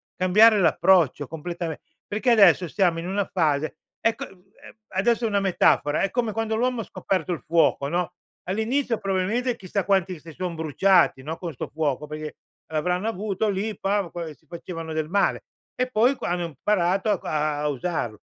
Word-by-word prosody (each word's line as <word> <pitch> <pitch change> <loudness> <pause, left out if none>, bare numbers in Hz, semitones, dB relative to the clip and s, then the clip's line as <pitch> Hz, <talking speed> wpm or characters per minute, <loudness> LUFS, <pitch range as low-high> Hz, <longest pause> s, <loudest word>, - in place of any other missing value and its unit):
cambiare 210 +4 +5
l'approccio 170 -5 +3
completame 165 +1 -5 0.3
perché 215 +5 +1
adesso 190 -5 +6
stiamo 175 -1 +1
in 165 +1 -4
una 200 +1 0
fase 155 -4 0 0.2
ecco, 225 - 0
uhm, 190 0 -21 0.4
adesso 230 +5 +1
è - - +2
una 205 -2 +1
metafora: 170 -5 +2
è 195 - +1
come 235 +1 -1
quando 220 +1 -2
l'uomo 245 +1 0
ha - - -5
scoperto 185 -4 -2
il 165 - -4
fuoco, 155 -3 +2
no? 175 +2 -2 0.3
All'inizio 230 +5 0
probabilmente 205 +7 -1
chissà 185 0 -3
quanti 190 -3 +1
si 165 +2 -12
son 175 +1 -4
bruciati, 160 -1 +3
no, 155 +4 -5
con 170 -3 -6
sto - - -5
fuoco 150 -2 -2
perché 155 0 -6 0.4
l'avranno 180 +6 0
avuto 210 0 -2
lì, 205 +1 -2
pam, 195 -2 -1
qua 175 -1 -5
e 155 - -8
si 160 - -29
facevano 165 0 -7
del 155 -1 -2
male. 200 +2 +1 0.3
E 255 0 -1
poi 245 +4 +3
qua - - -4
hanno 175 0 -1
imparato 180 - 0
a 150 -5 -1
usarlo. 135 - -3
180 Hz, 175 wpm, -24 LUFS, 160-205 Hz, 0.4 s, adesso